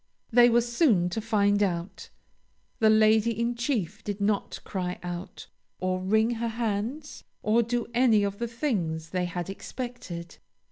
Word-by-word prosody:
They 240 +1 +7
were 240 0 +4
soon 235 - +2
to 220 +5 -3
find 205 -2 +2
out. 175 -2 -2 0.7
The 220 - +5
Lady 220 +1 +4
in 235 +1 +1
Chief 235 - -2
did 205 0 -4
not 200 0 -1
cry 180 -2 -3
out, 175 +1 -6 0.3
or 185 0 -1
wring 220 +5 +2
her 235 0 -2
hands, 230 +6 -3 0.2
or 220 +3 +3
do 235 +1 -1
any 235 -4 +4
of 200 0 -2
the 235 - -1
things 185 - -2
they 180 -1 0
had 175 -1 -4
expected. 195 -5 -7
215 Hz, 150 wpm, -27 LUFS, 185-235 Hz, 0.7 s, They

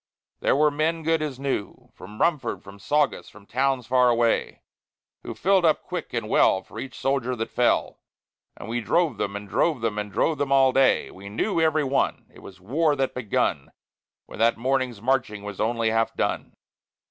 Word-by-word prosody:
There - - +2
were 150 +1 +3
men 160 +3 -1
good 165 0 +1
as 145 -4 -4
new, 135 -7 -4
From 105 +3 -12
Rumford, 165 -5 0
from 100 0 -13
Saugus, 145 +5 0
from 105 -1 -17
towns 130 +1 0
far 125 +1 +3
away, 120 -1 0 0.6
Who - - -7
filled 195 -1 +2
up 160 -2 +2
quick - - -6
and - - -3
well 95 - +3
for - - -10
each 135 - -7
soldier 130 -2 -1
that 115 -1 -4
fell; 125 - +1 0.6
And - - -9
we 120 +1 -2
drove 170 +6 +1
them, 100 0 -2
and 100 0 -6
drove 150 +4 +1
them, 110 -2 -1
and 105 -1 -5
drove 155 +6 0
them, 140 -1 -1
all 135 -1 +5
day. 135 0 +3
We 100 +1 -11
knew, 165 - -1
every 155 -1 +2
one, 135 0 0
it - - -15
was 95 -1 -13
war 145 - +1
that 135 -1 -1
begun, 120 -5 -1 0.5
When - - -12
that 115 +1 +3
morning's 125 -3 -1
marching 125 -5 0
was 105 -2 -7
only 115 0 +1
half 115 0 0
done. - - -2
130 Hz, 190 wpm, -24 LUFS, 110-145 Hz, 0.6 s, all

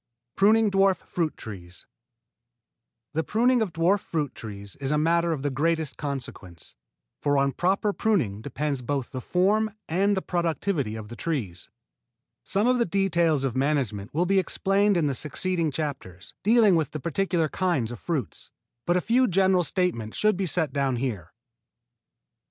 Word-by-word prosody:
IV - - -49
PRUNING 215 +2 +5
DWARF 195 -1 +3
FRUIT 165 -2 -3
TREES 90 -5 -10 1.3
The 160 +1 0
pruning 240 +5 +2
of 210 -5 -1
dwarf 170 +5 +2
fruit 150 -7 -3
trees 100 -2 -8
is 135 -1 -3
a 150 - +2
matter 170 +2 +2
of 145 -4 -3
the 145 - 0
greatest 160 +2 0
consequence, 120 - -7 0.5
for 145 -1 +2
on 140 0 +2
proper 195 +6 0
pruning 140 - 0
depend 140 -1 -3
both 140 -4 -2
the 130 - -5
form 205 - +2 0.2
and 195 +4 +1
the 190 - -2
productivity 170 - -1
of 110 -1 -8
the 120 - -8
trees. 115 - -4 0.7
Some 200 +3 0
of 250 0 +3
the 235 - +3
details 170 -6 +1
of 130 -3 -1
management 130 -7 -1
will 165 +6 +1
be 195 +1 +3
explained 195 +1 +1
in 165 - +2
the 140 - +1
succeeding 165 +5 -1
chapters, 135 - -5
dealing 215 -2 +5
with 160 -4 0
the 155 - -3
particular 170 +2 0
kinds 155 -9 -1
of 120 - -7
fruits, 150 - -4 0.4
but 175 +1 +3
a - - +1
few 250 +6 +3
general 190 -1 +3
statements 170 - -1
should 215 -1 +3
be 190 0 -2
set 160 -4 0
down 135 -2 0
here. 120 -8 -3
1. - - -25
160 Hz, 170 wpm, -26 LUFS, 135-190 Hz, 1.3 s, PRUNING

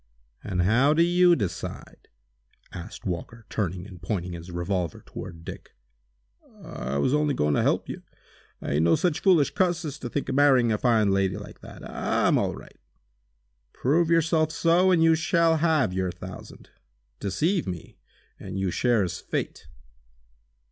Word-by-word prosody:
"And 90 -3 -1
how 125 +10 +3
do 165 - +5
you 175 0 +5
decide?" 90 - -6 0.7
asked 90 +4 -9
Walker, 100 +5 -5
turning 90 -3 -2
and 95 -4 -12
pointing 90 0 -3
his 85 +1 -8
revolver 85 -1 -3
toward 85 -1 -9
Dick. - - -10 0.9
"I 65 +3 -4
was 70 - +1
only 150 -1 +1
goin' 75 0 +1
to - - +2
help - - +1
you. - - -6 0.6
I - - -3
ain't 75 +3 +2
no 85 0 +4
such 175 -5 0
foolish 175 -7 +4
cuss 175 -3 +1
as 145 -1 -6
to 120 - -5
think 140 - -3
of - - -2
marrying 130 -4 +4
a 105 - 0
fine 110 -5 +3
lady 95 -1 +1
like 105 - -10
that! - - -11
I'm - - +1
all - - -1
right!" - - -14 0.9
"Prove 160 +6 +1
yourself 160 -1 +2
so, 170 +3 +3
and 175 -3 +4
you 165 0 +6
shall 165 0 +2
have 155 - +2
your 95 -1 -1
thousand. - - -11 0.5
Deceive 155 - 0
me, 90 -3 -7 0.4
and - - -7
you 95 -1 -1
share 120 -1 +2
his 90 - -4
fate!" - - -4
115 Hz, 160 wpm, -26 LUFS, -, 0.9 s, you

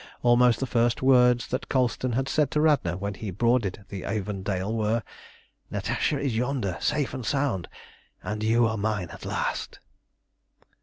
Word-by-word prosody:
Almost 120 -1 +5
the 135 - 0
first 120 -1 +1
words 125 -2 +5
that 130 - -3
Colston 130 -1 0
had 135 +3 0
said 150 -1 +1
to 150 - 0
Radna 145 - +2
when 100 +1 -3
he 105 +1 -6
boarded 105 -1 0
the 95 -2 -6
Avondale 100 0 -2
were 110 +1 0 0.7
"Natasha 145 - -1
is 140 -4 -1
yonder, 120 -6 -1
safe 150 -2 0
and 130 - -5
sound, 135 -9 -1 0.5
and 105 0 -4
you 115 +2 +3
are 110 0 0
mine 100 -4 -1
at - - -10
last!" - - -3
115 Hz, 155 wpm, -26 LUFS, 100-130 Hz, 0.7 s, Almost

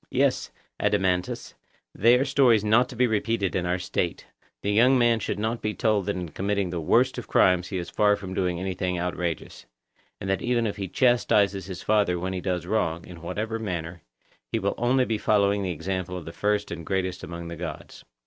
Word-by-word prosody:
Yes, - - +1 0.3
Adeimantus, 95 -3 0 0.4
they 120 +4 +5
are 135 - +1
stories 130 -6 +4
not 110 +4 +3
to 125 - -9
be 125 +2 +3
repeated 110 -3 0
in 90 -1 0
our 90 +1 +1
State; 90 -1 -2 0.4
the 100 - 0
young 125 +5 +5
man 120 -2 +3
should 100 - -3
not 110 +3 -2
be 105 0 -2
told 105 -4 +1
that 100 - 0
in 90 -2 -4
committing 100 +2 -1
the 85 -2 -3
worst 75 - +2
of - - -9
crimes 90 -1 +3
he 95 - -4
is 85 - -5
far 105 -1 +3
from 95 -2 -7
doing 90 -2 -1
anything 90 -1 -2
outrageous; 85 -2 -4 0.5
and 95 - -6
that 95 -1 0
even 120 -1 +1
if 105 - -2
he 100 -1 -3
chastises 105 -5 +2
his 95 -2 -7
father 105 -4 +2
when 95 +2 -3
he 90 - -3
does 90 -2 -2
wrong, 85 -6 -1
in 85 -2 -11
whatever 110 +6 -3
manner, 85 -5 -4 0.5
he - - +1
will - - 0
only 125 +2 +2
be 110 -3 -1
following 100 -1 +2
the 95 - -2
example 90 +2 -3
of 85 - -8
the 80 - -8
first 105 +1 0
and 85 -1 -5
greatest 95 +1 -2
among 85 0 -6
the 85 - -6
gods. 80 -3 -7
95 Hz, 205 wpm, -26 LUFS, 90-110 Hz, 0.5 s, they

